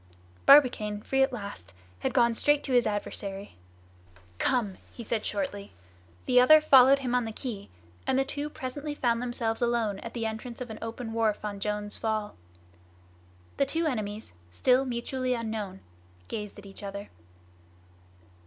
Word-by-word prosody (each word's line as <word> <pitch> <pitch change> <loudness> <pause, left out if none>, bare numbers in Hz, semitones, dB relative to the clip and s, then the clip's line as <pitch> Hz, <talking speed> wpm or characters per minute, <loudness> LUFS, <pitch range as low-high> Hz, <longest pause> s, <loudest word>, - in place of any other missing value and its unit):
Barbicane, 240 -7 +6
free 270 0 +1
at 265 0 +3
last, 200 - -8 0.2
had - - -1
gone 235 -1 +3
straight 290 +5 +2
at 265 - -1
his 245 -1 +4
adversary. 205 -1 -4 0.8
"Come!" 225 -8 0
he 235 - -9
said 220 0 -2
shortly. 200 0 -4 0.5
The 250 -1 +5
other 310 +5 +8
followed 275 -3 +7
him 255 -3 -3
on 250 0 +2
the 225 - -4
quay; 215 -4 -6 0.4
and 260 - +2
the 270 - +2
two 290 +2 -4
presently 290 +2 -5
found 235 -4 +1
themselves 240 -2 -2
alone 235 -4 0
at 230 - -8
the 230 -1 -2
entrance 220 +2 -5
of 250 -3 -6
an 220 - -8
open 230 0 -5
wharf 220 -2 0
on 205 -1 -4
Jones' 210 0 -2
Fall. 215 -2 -2 1.2
The 275 - +3
two 330 +4 0
enemies, 215 - -3 0.2
still 255 - +3
mutually 255 +1 -2
unknown, 220 -5 -4 0.5
gazed 210 -1 -6
at 205 - -11
each 195 +1 -12
other. 200 0 -6
230 Hz, 155 wpm, -28 LUFS, 210-255 Hz, 1.2 s, other